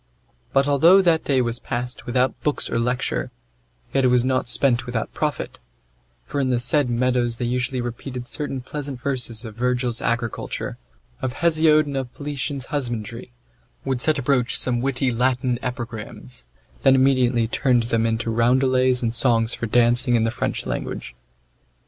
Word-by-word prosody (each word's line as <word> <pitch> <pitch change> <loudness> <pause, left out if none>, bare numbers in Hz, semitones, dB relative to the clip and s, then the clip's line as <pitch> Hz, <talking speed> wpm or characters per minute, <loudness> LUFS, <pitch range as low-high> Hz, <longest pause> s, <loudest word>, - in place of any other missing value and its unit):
But 135 +1 +2
although 160 +7 +6
that 165 -3 +2
day 130 -3 +2
was 120 0 -2
passed 125 +1 -5
without 125 +1 0
books 150 - -1
or 115 - 0
lecture, 115 - -1 0.6
yet 135 - +2
was 125 -1 +3
it - - -1
not 130 -2 0
spent 125 -2 +2
without 120 -2 -3
profit; 150 -2 -3 0.7
for 145 - -3
in 135 -2 +1
the 125 - +2
said 125 +2 +2
meadows 120 -1 +1
they 120 - -2
usually 125 +1 -1
repeated 120 +1 -6
certain 135 -2 -4
pleasant 140 0 -6
verses 125 -3 0
of 110 - -7
Virgil's 125 0 -1
agriculture, 115 -1 -3 0.4
of 130 - -2
Hesiod 155 -2 +4
and 140 -1 -5
of 130 -2 -4
Politian's 140 -2 -4
husbandry, 120 -4 -3 0.5
would 130 -2 -1
set 155 +2 +3
a 140 - -3
broach 125 -2 +1
some 120 -2 +2
witty 130 0 0
Latin 125 0 0
epigrams, 110 - -6 0.4
then 135 -1 +5
immediately 130 -3 +3
turned 120 0 +2
them 115 0 0
into 115 0 -1
roundelays 130 +2 +3
and 115 -1 0
songs 115 -1 +2
for 115 - -4
dancing 120 +2 +3
in 115 - +2
the 115 - +1
French - - -3
language. - - -5
125 Hz, 160 wpm, -22 LUFS, 120-135 Hz, 0.7 s, although